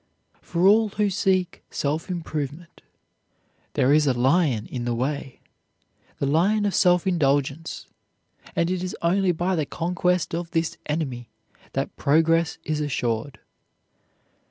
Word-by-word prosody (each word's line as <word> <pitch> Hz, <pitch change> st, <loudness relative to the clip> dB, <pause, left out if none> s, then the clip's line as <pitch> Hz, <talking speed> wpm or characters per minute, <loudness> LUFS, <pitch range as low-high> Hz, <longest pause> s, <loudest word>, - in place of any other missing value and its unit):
For 170 Hz, +1 st, 0 dB
all 215 Hz, +2 st, +5 dB
who 205 Hz, 0 st, 0 dB
seek 185 Hz, -1 st, 0 dB
self 150 Hz, +5 st, -2 dB
improvement 160 Hz, -2 st, -5 dB, 0.9 s
"there 130 Hz, +3 st, +3 dB
is 150 Hz, -1 st, +4 dB
a 130 Hz, -, +2 dB
lion 130 Hz, -2 st, +2 dB
in 125 Hz, -2 st, -5 dB
the 120 Hz, 0 st, -1 dB
way," 135 Hz, +1 st, -3 dB, 0.8 s
the -, -, -1 dB
lion 190 Hz, +9 st, +2 dB
of 200 Hz, -, 0 dB
self 180 Hz, -2 st, +4 dB
indulgence, 145 Hz, -3 st, 0 dB, 0.7 s
and 170 Hz, +1 st, +1 dB
it 185 Hz, -1 st, -1 dB
is 185 Hz, -, -4 dB
only 185 Hz, +2 st, +3 dB
by 175 Hz, +3 st, 0 dB
the 155 Hz, -4 st, -1 dB
conquest 180 Hz, 0 st, 0 dB
of 170 Hz, 0 st, -3 dB
this 165 Hz, 0 st, -1 dB
enemy 135 Hz, -6 st, -3 dB, 0.4 s
that -, -, -2 dB
progress 165 Hz, +3 st, +2 dB
is 155 Hz, -1 st, -2 dB
assured. 125 Hz, -2 st, -2 dB
165 Hz, 130 wpm, -24 LUFS, 140-180 Hz, 0.9 s, all